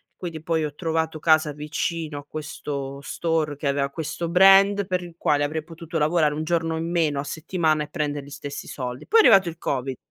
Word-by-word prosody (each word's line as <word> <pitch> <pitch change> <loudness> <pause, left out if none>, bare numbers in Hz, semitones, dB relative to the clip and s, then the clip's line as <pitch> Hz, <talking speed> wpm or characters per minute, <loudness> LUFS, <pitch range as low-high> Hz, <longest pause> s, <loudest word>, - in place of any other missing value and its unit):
quindi 165 -4 -6
poi 160 -1 0
ho 150 -1 -3
trovato 160 -1 -1
casa 155 -1 +3
vicino 150 +1 -3
a 145 - -12
questo 140 -3 -6
store 160 -1 -1
che 145 - -3
aveva 140 0 0
questo 160 +3 -4
brand 195 +3 +6
per 185 -1 -1
il 170 -1 -11
quale 145 -3 +2
avrei 155 +2 -2
potuto 165 0 -6
lavorare 155 0 +2
1 155 - -3
giorno 165 -1 0
in 165 +1 -3
meno 160 -5 +1
a - - -2
settimana 160 +1 0
e 150 - -9
prendere 145 -3 -3
gli - - -12
stessi 145 0 -7
soldi. 125 0 -6
Poi 455 - +4
è - - +7
arrivato 195 - +6
il 165 - -9
Covid. 135 -4 -2
160 Hz, 210 wpm, -24 LUFS, 145-170 Hz, -, è